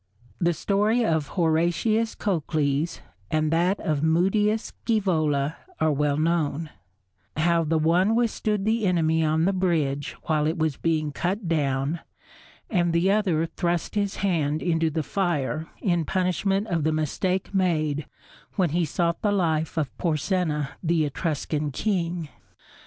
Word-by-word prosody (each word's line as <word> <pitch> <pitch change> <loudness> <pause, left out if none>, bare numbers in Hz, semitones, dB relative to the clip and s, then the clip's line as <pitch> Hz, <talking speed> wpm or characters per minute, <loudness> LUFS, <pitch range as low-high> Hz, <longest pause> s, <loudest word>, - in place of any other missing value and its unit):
The 175 -1 +2
story 210 +7 +1
of 160 -5 +1
Horatius 175 +7 +1
Cocles 155 -4 -1 0.3
and 155 0 +1
that 180 +4 +2
of 150 -3 -1
Mutius 195 +7 +2
Scævola 160 -9 +1 0.2
are 155 - +3
well 145 0 +1
known: 155 -1 0 0.7
how 170 +1 +3
the 160 +1 +1
one 175 +7 +3
withstood 215 -3 0
the 220 -1 +1
enemy 160 -2 +2
on 160 +1 +2
the 195 - +2
bridge 155 -7 0
while 155 -2 +1
it 160 +3 -1
was 155 -3 0
being 155 -1 0
cut 185 +6 -2
down, 145 -1 0 0.7
and 175 -4 +1
the 175 +3 +3
other 185 -6 +2
thrust 170 -1 -2
his 200 -2 -1
hand 155 -5 0
into 165 -2 +1
the 160 0 -2
fire 160 -4 -1 0.2
in 175 -4 +2
punishment 190 +3 0
of 165 -4 0
the 155 - +2
mistake 180 +6 -1
made 155 -6 0 0.5
when 180 -6 +1
he 170 +1 +1
sought 170 +2 -1
the 205 - +2
life 160 -5 0
of 145 -6 -1
Porsenna 155 -3 0
the 165 -2 +2
Etruscan 150 0 -2
king. 170 0 -1
165 Hz, 140 wpm, -25 LUFS, 155-185 Hz, 0.7 s, are